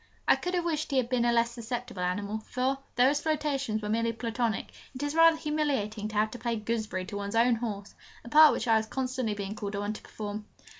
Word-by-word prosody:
I - - +7
could 360 +1 -3
have 350 -1 0
wished 310 -2 -1
he 275 - 0
had 245 -2 +1
been 250 -2 +2
a 240 - +4
less 235 0 +2
susceptible 235 -4 -5
animal, 200 +4 -1
for, 255 +4 -1 0.2
though 250 +2 +5
his 290 +1 0
flirtations 280 -8 -1
were 210 - -3
merely 230 +1 +1
Platonic, 230 -1 -2 0.2
it 255 - -4
is 290 0 -1
rather 330 0 +6
humiliating 275 -10 -1
to 215 - -8
have 215 +1 +2
to 245 - -8
play 235 -1 -1
'gooseberry' 215 -4 -2
to 205 +1 -6
one's 200 +1 -4
own 235 +2 +5
horse 205 -4 -5 0.3
a - - -8
part 310 +2 +8
which - - -3
I 225 -1 +5
was 220 0 -1
constantly 255 -3 -2
being 200 0 -4
called 205 -2 -5
upon 205 +1 -2
to - - -9
perform! 210 0 -6
230 Hz, 235 wpm, -29 LUFS, 210-265 Hz, 0.3 s, part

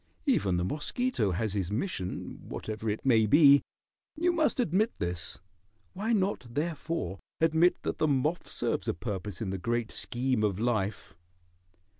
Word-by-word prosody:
Even 100 - +2
the 85 - 0
mosquito 155 - -1
has 100 +3 -1
his 95 -4 -1
mission, 105 - -3
whatever 110 0 -4
it 105 +5 -3
may 110 -4 +5
be. 140 +2 +7 0.5
You 340 +3 +2
must 315 -5 +1
admit 215 +1 +2
this. 85 0 -3 0.6
Why 205 +5 -2
not, 195 - +1
therefore, 150 - -2 0.2
admit 165 +2 +3
that - - -2
the 155 - +3
moth 150 +4 0
serves - - -2
a - - 0
purpose 95 -2 -5
in 100 -4 -2
the 95 - -3
great 120 +3 -1
scheme 125 -2 -1
of 100 -2 +1
life?" 105 -4 -1
120 Hz, 150 wpm, -29 LUFS, 100-170 Hz, 0.6 s, be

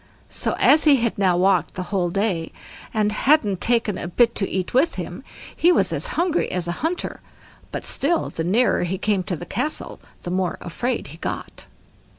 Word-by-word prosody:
So - - 0
as 310 - +5
he 295 -2 +7
had 235 -3 0
now 185 -3 +3
walked 185 -2 +2
the 185 - -3
whole 180 -3 +1
day 185 -3 -1 0.4
and 210 -1 +1
hadn't 215 - +2
taken 230 -5 +1
a - - -4
bit 235 +6 +3
to 195 - -1
eat 185 -1 -3
with 275 +7 +3
him, - - -6 0.3
he 345 - +4
was - - +2
as - - -1
hungry 345 0 +1
as 180 -1 -2
a - - 0
hunter, 340 +3 -2 0.5
but - - -5
still 325 +4 0
the 165 - -3
nearer 215 +9 +2
he 180 +2 -1
came 200 0 +1
to 180 - -2
the 175 - -8
castle, 305 - -3 0.2
the 175 - -4
more 185 -1 -1
afraid 235 - -3
he 160 - -11
got. - - -6
205 Hz, 190 wpm, -22 LUFS, 180-255 Hz, 0.5 s, he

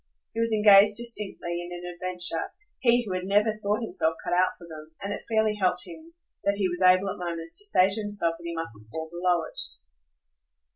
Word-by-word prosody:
He 225 - -4
was 230 0 +1
engaged 210 -1 +6
distinctly 210 -7 -2
in 175 0 -8
an 175 0 -6
adventure 175 -2 -2 0.3
he 240 -1 +3
who 195 - -4
had 185 0 -2
never 210 +3 +3
thought 215 +2 -1
himself 165 -6 0
cut - - -2
out 180 +1 +3
for 170 - -13
them, 155 -1 -11
and 200 +1 -4
it - - -7
fairly 220 -1 +2
helped 180 -1 +1
him 330 0 -12 0.3
that 200 - +1
he 195 -2 +1
was 175 +1 -4
able 185 +1 +5
at - - -8
moments 170 -2 -2
to 410 - -1
say 185 - +5
to 200 +3 -2
himself 205 -5 -1
that - - -13
he 170 0 -5
mustn't 110 -10 -6
fall 160 +4 -6
below 175 -1 +1
it. - - -9
185 Hz, 210 wpm, -27 LUFS, 170-210 Hz, 0.3 s, engaged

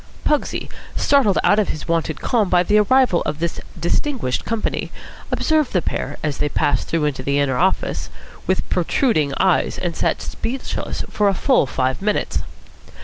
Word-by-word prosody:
Pugsy, 300 - 0 0.3
startled 265 -9 +3
out 205 - +4
of 210 - +2
his 155 - -5
wonted 165 -2 -1
calm 220 -6 +1
by 180 -1 +4
the 210 +3 +3
arrival 245 -3 +4
of 150 - -2
this 170 +1 -2 0.2
distinguished 175 - -1
company, 230 -1 -2 0.4
observed 310 -4 +1
the 180 - +2
pair, - - -3
as 150 -3 -2
they 150 - +1
passed 145 -2 0
through 160 -2 0
into 140 -3 -1
the 140 +2 0
inner 135 -3 +1
office, 190 +2 0 0.4
with - - 0
protruding 155 - +1
eyes, 185 -2 +2
and 175 -2 -3
sat - - 0
speechless 255 +3 -4
for 205 -1 +1
a 195 - 0
full 260 - +3
five 130 +3 -1
minutes. 210 +1 0
180 Hz, 165 wpm, -20 LUFS, 150-225 Hz, 0.4 s, out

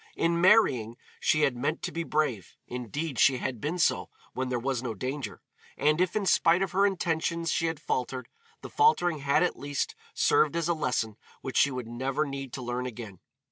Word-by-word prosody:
In 170 0 +1
marrying, 135 - +4 0.2
she 155 - +2
had 140 -4 +2
meant 145 +6 -2
to - - -2
be 165 - -3
brave; 150 - -1
indeed, 125 +3 -4
she 135 -1 +5
had 125 -3 -4
been 155 +5 -2
so 170 - +1 0.2
when 130 0 -2
there 125 - 0
was 130 0 -1
no 120 -3 -4
danger; 130 -3 -5 0.3
and 150 +4 +2
if 185 -1 +1
in 210 -2 0
spite 175 0 +4
of 190 - -3
her 195 +2 +4
intentions 170 -3 -1
she 165 - +1
had 165 -2 -3
faltered, 130 0 -3 0.4
the - - -7
faltering 175 - +3
had 140 +4 +2
at 180 - -1
least 145 0 -2 0.2
served 155 0 +3
as 170 -1 0
a 170 - +2
lesson 115 -9 -1 0.2
which 135 - -4
she 145 - +5
would 125 -3 -5
never 130 +5 -1
need 135 -2 -6
to 130 - -5
learn 125 +1 -3
again. 110 -6 -8
140 Hz, 200 wpm, -28 LUFS, 125-165 Hz, 0.4 s, she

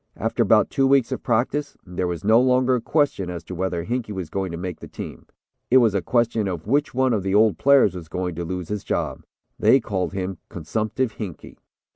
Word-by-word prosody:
After - - -1
about - - +4
two 135 -1 +2
weeks 135 -3 +3
of - - -3
practice, 130 +5 -1
there 90 0 -3
was 85 -2 -4
no 110 +3 +5
longer 130 0 +3
a 125 - +1
question 140 - 0
as 85 -2 -6
to 90 - -8
whether 90 -1 -2
Hinkey 120 -1 -3
was 95 -5 -5
going 95 -2 -2
to 85 - -5
make 90 +1 -5
the - - -9
team. - - -9 0.4
It 130 - +6
was 115 -5 +4
a 100 - 0
question 115 -2 +1
of 85 -4 -4
which 140 +4 0
one 130 -1 +2
of 105 - 0
the 95 +1 -1
old 110 0 +4
players 140 -8 +5
was 90 -3 -8
going 90 +2 -3
to 85 +2 -4
lose 90 0 -5
his 105 -1 -3
job. - - -2 0.4
They 135 - +5
called 95 -7 -3
him 95 -2 -4
'consumptive 110 +7 -2
Hinkey.'" 95 -8 -8
100 Hz, 220 wpm, -23 LUFS, 90-125 Hz, 0.4 s, It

